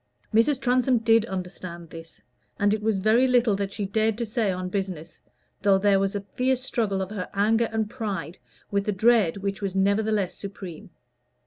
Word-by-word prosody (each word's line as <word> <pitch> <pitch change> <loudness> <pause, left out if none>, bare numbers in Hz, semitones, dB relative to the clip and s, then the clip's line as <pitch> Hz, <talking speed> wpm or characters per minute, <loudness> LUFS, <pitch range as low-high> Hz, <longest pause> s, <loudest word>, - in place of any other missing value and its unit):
Mrs. 235 +5 +3
Transome 255 0 +2
did 225 0 +3
understand 180 -3 -7
this; 165 0 -11 0.4
and 205 0 +3
it 215 - -1
was 215 -1 +1
very 220 +6 +3
little 245 -4 +3
that 200 -1 -3
she 205 -1 -3
dared 220 +2 0
to 235 - -2
say 220 -2 0
on 185 0 -3
business, 180 -4 -5 0.4
though 195 -1 +4
there 195 0 +3
was 195 +1 -1
a 200 - -2
fierce 255 0 +1
struggle 205 -7 -1
of 190 - -8
her 200 -4 -5
anger 225 +3 +2
and 220 -1 -1
pride 200 - -5 0.3
with 200 0 0
a - - +2
dread 210 -3 +3
which 200 0 -4
was 195 -2 -3
nevertheless 200 0 +1
supreme. 190 -4 -8
205 Hz, 185 wpm, -25 LUFS, 190-225 Hz, 0.4 s, though